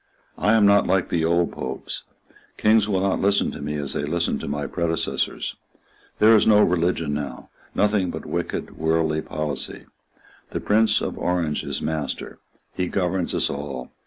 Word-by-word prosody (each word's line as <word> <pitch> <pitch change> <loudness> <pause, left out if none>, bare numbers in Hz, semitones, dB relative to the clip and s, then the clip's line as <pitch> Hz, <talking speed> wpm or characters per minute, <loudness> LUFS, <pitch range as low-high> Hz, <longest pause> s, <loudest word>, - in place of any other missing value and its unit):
I 105 - +3
am 110 -2 +5
not 100 0 +5
like 95 -1 +1
the 85 -2 0
old 85 +1 +2
Popes. 65 +1 -5 0.6
Kings 110 -1 +4
will 95 -2 +1
not 95 -1 +1
listen 100 +1 +2
to - - -8
me 75 +1 -3
as 70 -2 -1
they - - -1
listened 85 +3 0
to - - -6
my 70 0 -2
predecessors. 85 +1 -2 0.6
There 110 +1 +7
is 110 - +4
no 105 -1 +6
religion 85 -3 +1
now, 70 -4 -5 0.3
nothing 105 -3 +2
but - - -6
wicked, - - -4
worldly 80 0 +1
policy. 75 -1 -4 0.6
The - - -3
Prince 110 +1 +3
of - - -4
Orange 85 -4 0
is - - -4
master. 80 -2 -3 0.3
He 90 - -1
governs 90 -1 -1
us - - +1
all. 70 -3 -5
85 Hz, 165 wpm, -23 LUFS, 75-100 Hz, 0.6 s, There